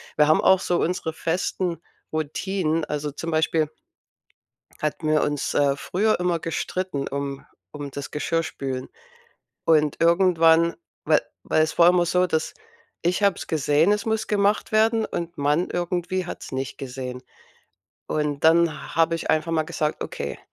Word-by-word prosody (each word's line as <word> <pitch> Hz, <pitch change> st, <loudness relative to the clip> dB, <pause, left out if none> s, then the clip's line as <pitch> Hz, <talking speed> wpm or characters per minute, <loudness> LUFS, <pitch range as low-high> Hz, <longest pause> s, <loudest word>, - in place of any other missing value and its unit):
Wir 150 Hz, -, +4 dB
haben 155 Hz, -, +5 dB
auch 190 Hz, 0 st, +5 dB
so 175 Hz, -, 0 dB
unsere 170 Hz, -2 st, -1 dB
festen 170 Hz, +1 st, -2 dB, 0.3 s
Routinen. 160 Hz, +1 st, -1 dB
Also, 150 Hz, 0 st, -3 dB
zum 165 Hz, +3 st, -6 dB
Beispiel 155 Hz, -1 st, +1 dB, 1.1 s
hatten 155 Hz, +1 st, -2 dB
wir 155 Hz, 0 st, +3 dB
uns, 145 Hz, -1 st, -1 dB
äh, 140 Hz, -1 st, +3 dB
früher 200 Hz, +9 st, 0 dB
immer 180 Hz, -2 st, 0 dB
gestritten, 165 Hz, -2 st, -3 dB
um 140 Hz, 0 st, -4 dB, 0.3 s
um 145 Hz, -2 st, -7 dB
das 140 Hz, 0 st, -6 dB
Geschirrspülen. 140 Hz, -4 st, -3 dB, 0.8 s
Und 150 Hz, -3 st, +3 dB
irgendwann 170 Hz, -1 st, +4 dB, 0.3 s
wa -, -, +5 dB, 0.3 s
war 155 Hz, -, +1 dB
es 155 Hz, +1 st, +2 dB
vorher 175 Hz, +1 st, +5 dB
immer 175 Hz, -1 st, +3 dB
so, 180 Hz, +1 st, +2 dB
dass 160 Hz, -3 st, -1 dB, 0.5 s
ich 180 Hz, +4 st, 0 dB
habe 200 Hz, -2 st, +3 dB
es -, -, -7 dB
gesehen, 155 Hz, +4 st, +2 dB
es 210 Hz, 0 st, -1 dB
muss 220 Hz, 0 st, 0 dB
gemacht 205 Hz, +1 st, +1 dB
werden 220 Hz, +1 st, +3 dB
und 170 Hz, 0 st, -5 dB
Mann 150 Hz, +5 st, +1 dB
irgendwie 175 Hz, +1 st, -2 dB
hat's -, -, -8 dB
nicht 135 Hz, 0 st, -4 dB
gesehen. 125 Hz, -1 st, -6 dB, 0.8 s
Und 150 Hz, -2 st, -1 dB
dann 165 Hz, -1 st, +3 dB
habe 165 Hz, +1 st, +3 dB
ich -, -, -6 dB
einfach 160 Hz, +2 st, +1 dB
mal 160 Hz, -1 st, +1 dB
gesagt: 155 Hz, -2 st, -2 dB
„Okay, -, -, -5 dB
165 Hz, 150 wpm, -24 LUFS, 150-180 Hz, 1.1 s, haben